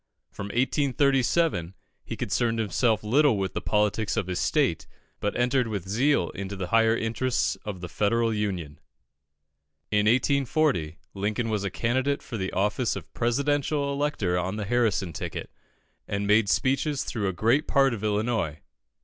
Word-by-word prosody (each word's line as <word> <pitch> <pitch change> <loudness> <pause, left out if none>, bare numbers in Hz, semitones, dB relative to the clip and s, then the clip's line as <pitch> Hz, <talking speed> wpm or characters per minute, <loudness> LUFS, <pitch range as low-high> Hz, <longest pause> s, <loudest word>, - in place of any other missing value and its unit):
From 100 - -6
1837 135 - +1 0.3
he - - -6
concerned 115 -1 0
himself 110 -1 +1
little 130 +2 +3
with 95 -1 -2
the - - -3
politics 105 +1 0
of 110 - 0
his 90 0 -3
state, - - +1 0.3
but 105 - -2
entered 125 0 +2
with 100 -5 -4
zeal 120 - +2
into 100 +1 -6
the 95 -2 -5
higher 115 0 +4
interests 120 +3 0
of 100 -4 -5
the 90 - -5
Federal 115 +7 +1
Union. 95 -9 -3 1.1
In 105 0 +2
1840, 130 - +1 0.2
Lincoln 105 +4 -2
was 105 -2 -1
a 100 - -1
candidate 130 +8 0
for 120 - -6
the 95 -2 -3
office 105 +5 0
of - - -9
Presidential 140 +3 0
elector 140 -12 0
on 95 +3 -2
the 105 -1 -3
Harrison 105 -6 +1
ticket, - - -5 0.6
and 100 0 -2
made 105 0 +4
speeches 135 +4 +1
through 105 -4 -2
a - - +1
great 115 - +1
part 135 -2 +3
of 110 -2 -6
Illinois. 105 -7 0
110 Hz, 155 wpm, -26 LUFS, 100-130 Hz, 1.1 s, higher